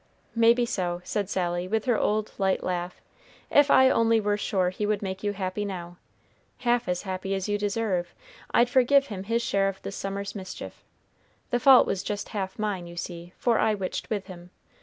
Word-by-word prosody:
"Maybe 235 Hz, +1 st, +4 dB
so," 175 Hz, -5 st, -2 dB
said 200 Hz, +1 st, -2 dB
Sally, 175 Hz, -2 st, -1 dB
with 220 Hz, +2 st, -1 dB
her 245 Hz, -3 st, +3 dB
old 215 Hz, 0 st, 0 dB
light 190 Hz, -1 st, +1 dB
laugh. 180 Hz, 0 st, -3 dB, 0.5 s
"If 290 Hz, 0 st, +5 dB
I 260 Hz, -1 st, +7 dB
only 230 Hz, -2 st, +3 dB
were 205 Hz, -1 st, +1 dB
sure 190 Hz, -3 st, 0 dB
he 205 Hz, +3 st, -3 dB
would 210 Hz, -1 st, 0 dB
make 190 Hz, 0 st, -4 dB
you 205 Hz, -, 0 dB
happy 195 Hz, +1 st, -3 dB
now, 175 Hz, -3 st, -6 dB, 0.6 s
half 245 Hz, -1 st, +1 dB
as 180 Hz, 0 st, -1 dB
happy 190 Hz, 0 st, -3 dB
as 195 Hz, 0 st, -3 dB
you 205 Hz, 0 st, 0 dB
deserve, 200 Hz, -4 st, -1 dB, 0.3 s
I'd 240 Hz, -, +4 dB
forgive 270 Hz, +2 st, +4 dB
him 190 Hz, 0 st, -6 dB
his 230 Hz, +2 st, 0 dB
share 195 Hz, -2 st, +1 dB
of 195 Hz, -, -7 dB
this 200 Hz, -, -5 dB
summer's 200 Hz, +1 st, -4 dB
mischief. 185 Hz, -3 st, -8 dB, 0.7 s
The 245 Hz, -, +2 dB
fault 265 Hz, -1 st, +7 dB
was 185 Hz, -, -1 dB
just 205 Hz, +1 st, -4 dB
half 190 Hz, -3 st, -4 dB
mine, 205 Hz, -5 st, -2 dB
you 170 Hz, -, -10 dB
see, 175 Hz, 0 st, -7 dB
for 235 Hz, -2 st, +2 dB
I 215 Hz, -, +2 dB
witched 190 Hz, -2 st, -4 dB
with 205 Hz, -3 st, -2 dB
him. 180 Hz, -2 st, -11 dB
200 Hz, 195 wpm, -26 LUFS, 185-220 Hz, 0.7 s, I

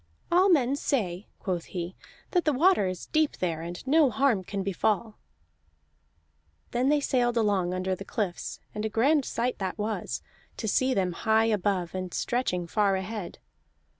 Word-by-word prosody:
"All 370 Hz, +3 st, +5 dB
men 275 Hz, -6 st, +4 dB
say," 205 Hz, -10 st, -1 dB
quoth 180 Hz, -4 st, -3 dB
he, 175 Hz, 0 st, -5 dB, 0.4 s
"that 355 Hz, -2 st, +2 dB
the 305 Hz, -, +2 dB
water 310 Hz, -, +4 dB
is 185 Hz, -1 st, -4 dB
deep 310 Hz, -1 st, +1 dB
there, 165 Hz, -3 st, -1 dB
and 175 Hz, +6 st, -7 dB
no 295 Hz, +1 st, +5 dB
harm 230 Hz, -3 st, +2 dB
can 195 Hz, +1 st, -3 dB
befall." 210 Hz, +3 st, -1 dB, 1.5 s
Then 250 Hz, +3 st, +1 dB
they 295 Hz, 0 st, +4 dB
sailed 245 Hz, -4 st, +1 dB
along 200 Hz, -5 st, +2 dB
under 185 Hz, +1 st, -1 dB
the 185 Hz, -, -5 dB
cliffs, 195 Hz, -3 st, -3 dB
and 210 Hz, -, -4 dB
a 220 Hz, -, 0 dB
grand 270 Hz, +6 st, +3 dB
sight 245 Hz, +2 st, -2 dB
that 190 Hz, -2 st, -3 dB
was, 215 Hz, +1 st, -3 dB, 0.3 s
to 220 Hz, -, -3 dB
see 260 Hz, +5 st, +2 dB
them 185 Hz, -2 st, +1 dB
high 220 Hz, +5 st, +2 dB
above 200 Hz, -5 st, 0 dB
and 185 Hz, -1 st, -4 dB
stretching 210 Hz, -8 st, -1 dB
far 200 Hz, +3 st, +2 dB
ahead. 190 Hz, 0 st, -5 dB
210 Hz, 165 wpm, -28 LUFS, 185-255 Hz, 1.5 s, All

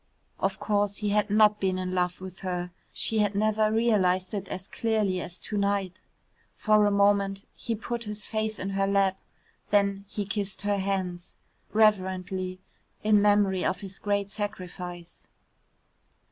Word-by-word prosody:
Of -, -, -1 dB
course 205 Hz, -1 st, 0 dB
he 210 Hz, -1 st, -1 dB
had 210 Hz, +1 st, +2 dB
not 210 Hz, 0 st, +5 dB
been 190 Hz, -1 st, 0 dB
in 185 Hz, 0 st, -3 dB
love 180 Hz, 0 st, 0 dB
with 185 Hz, -1 st, -8 dB
her. 180 Hz, -1 st, -3 dB, 0.2 s
She 220 Hz, -, +1 dB
had 205 Hz, -1 st, +1 dB
never 215 Hz, +1 st, +2 dB
realised 205 Hz, -5 st, +2 dB
it 200 Hz, -2 st, -3 dB
as 185 Hz, +2 st, -6 dB
clearly 215 Hz, -5 st, 0 dB
as 175 Hz, +1 st, -5 dB
to 210 Hz, -, -3 dB
night. 200 Hz, -2 st, -1 dB, 0.6 s
For 215 Hz, -1 st, +4 dB
a -, -, +2 dB
moment 200 Hz, 0 st, +2 dB
he 230 Hz, -, -3 dB
put 235 Hz, +2 st, -4 dB
his 210 Hz, 0 st, -6 dB
face 215 Hz, -1 st, -2 dB
in 195 Hz, +1 st, -4 dB
her 195 Hz, 0 st, +1 dB
lap, 195 Hz, -1 st, +2 dB, 0.5 s
then 200 Hz, -1 st, +2 dB
he 205 Hz, 0 st, -3 dB
kissed 200 Hz, 0 st, -3 dB
her 205 Hz, -1 st, +1 dB
hands 185 Hz, -2 st, -3 dB, 0.4 s
reverently, 185 Hz, -3 st, +1 dB, 0.4 s
in 210 Hz, -1 st, +5 dB
memory 205 Hz, -2 st, +3 dB
of 185 Hz, -, 0 dB
his 195 Hz, -1 st, -6 dB
great 200 Hz, -1 st, -1 dB
sacrifice. 180 Hz, -4 st, -6 dB
200 Hz, 155 wpm, -27 LUFS, 185-210 Hz, 0.6 s, not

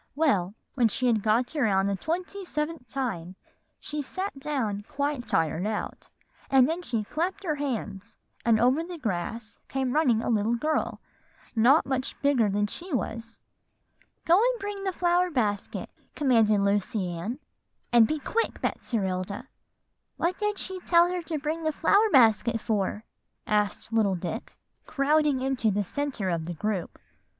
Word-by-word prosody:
"Well, 210 Hz, -, +1 dB, 0.2 s
when 245 Hz, -4 st, +3 dB
she 255 Hz, +4 st, -2 dB
had 230 Hz, -4 st, +3 dB
got 230 Hz, +7 st, +1 dB
around 205 Hz, -9 st, +2 dB
the 200 Hz, 0 st, 0 dB
twenty 360 Hz, -, -3 dB
seventh 300 Hz, -5 st, -3 dB
time, 195 Hz, -11 st, -3 dB, 0.4 s
she 300 Hz, 0 st, -4 dB
sat 370 Hz, +2 st, -5 dB
down 250 Hz, -9 st, -2 dB
quite 285 Hz, -3 st, -2 dB
tired 165 Hz, +4 st, +1 dB
out; 215 Hz, -1 st, -4 dB, 0.4 s
and 265 Hz, -2 st, +6 dB
then 330 Hz, +3 st, -2 dB
she 235 Hz, -10 st, -2 dB
clapped 345 Hz, -, -3 dB
her 325 Hz, -5 st, 0 dB
hands, 230 Hz, -7 st, -4 dB, 0.3 s
and 230 Hz, -2 st, +4 dB
over 255 Hz, +7 st, +3 dB
the 350 Hz, 0 st, -7 dB
grass 220 Hz, -, -4 dB
came 265 Hz, -2 st, -1 dB
running 250 Hz, -8 st, +3 dB
a -, -, -1 dB
little 220 Hz, +1 st, +2 dB
girl 305 Hz, +6 st, -1 dB, 0.6 s
not 250 Hz, +8 st, +5 dB
much 265 Hz, -1 st, -3 dB
bigger 260 Hz, -7 st, +3 dB
than 205 Hz, +1 st, +1 dB
she 345 Hz, -, -7 dB
was. 230 Hz, -3 st, -3 dB, 0.9 s
'Go 350 Hz, +4 st, +5 dB
and -, -, +2 dB
bring 405 Hz, -1 st, -5 dB
the 380 Hz, -, +1 dB
flower 355 Hz, 0 st, +2 dB
basket,' 210 Hz, -, -2 dB, 0.2 s
commanded 225 Hz, -8 st, +3 dB
Lucy 200 Hz, 0 st, 0 dB
Ann, 175 Hz, +9 st, -4 dB, 0.6 s
'and 235 Hz, -2 st, +7 dB
be 310 Hz, -, -1 dB
quick, 455 Hz, -, -1 dB
Betserilda.'" 200 Hz, +2 st, -2 dB, 0.7 s
"What 355 Hz, +2 st, 0 dB
did 420 Hz, -1 st, 0 dB
she 375 Hz, 0 st, -3 dB
tell 345 Hz, 0 st, +4 dB
her 360 Hz, -1 st, -2 dB
to 325 Hz, -1 st, -3 dB
bring 310 Hz, +3 st, -3 dB
the 315 Hz, -1 st, 0 dB
flower 405 Hz, +8 st, +3 dB
basket 230 Hz, -2 st, +5 dB
for?" 210 Hz, -1 st, -1 dB, 0.4 s
asked 210 Hz, +1 st, 0 dB
little 210 Hz, -4 st, +3 dB
Dick, 180 Hz, +6 st, -5 dB, 0.3 s
crowding 295 Hz, -1 st, +2 dB
into 260 Hz, -4 st, +1 dB
the 205 Hz, 0 st, +1 dB
centre 235 Hz, -3 st, -2 dB
of 165 Hz, -2 st, -2 dB
the 175 Hz, +1 st, -5 dB
group. 210 Hz, 0 st, -3 dB
250 Hz, 155 wpm, -27 LUFS, 210-315 Hz, 0.9 s, and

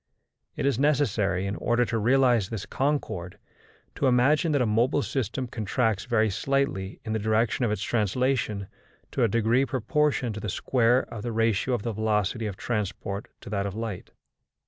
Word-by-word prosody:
It -, -, -2 dB
is 140 Hz, -4 st, +1 dB
necessary, 115 Hz, -10 st, +1 dB
in 100 Hz, +1 st, -2 dB
order 120 Hz, 0 st, +1 dB
to 115 Hz, -1 st, -1 dB
realise 120 Hz, -3 st, +3 dB
this 110 Hz, -4 st, -4 dB
concord, 110 Hz, -11 st, -2 dB, 0.6 s
to 140 Hz, -, 0 dB
imagine 145 Hz, +7 st, +3 dB
that 140 Hz, -, +2 dB
a -, -, +1 dB
mobile 120 Hz, +6 st, +2 dB
system 130 Hz, 0 st, -2 dB
contracts 110 Hz, -2 st, -1 dB
very 110 Hz, -3 st, +2 dB
slightly 105 Hz, -3 st, -1 dB
in 110 Hz, -, -2 dB
the 110 Hz, -, 0 dB
direction 110 Hz, +3 st, +1 dB
of -, -, +1 dB
its 105 Hz, 0 st, -2 dB
translation 110 Hz, -1 st, 0 dB, 0.5 s
to 130 Hz, -, 0 dB
a -, -, +5 dB
degree 115 Hz, +4 st, +2 dB
proportioned 130 Hz, 0 st, 0 dB
to 105 Hz, -, -6 dB
the 105 Hz, -, -3 dB
square 125 Hz, +5 st, +2 dB
of 110 Hz, -, -5 dB
the 120 Hz, -, -3 dB
ratio 115 Hz, +2 st, +1 dB
of 105 Hz, -, -4 dB
the 115 Hz, -, -2 dB
velocity 110 Hz, +1 st, 0 dB
of 100 Hz, -3 st, -6 dB
transport 105 Hz, -2 st, -3 dB
to -, -, -9 dB
that 100 Hz, -1 st, -1 dB
of 100 Hz, -, -6 dB
light. 110 Hz, -4 st, -5 dB
115 Hz, 175 wpm, -26 LUFS, 105-130 Hz, 0.6 s, a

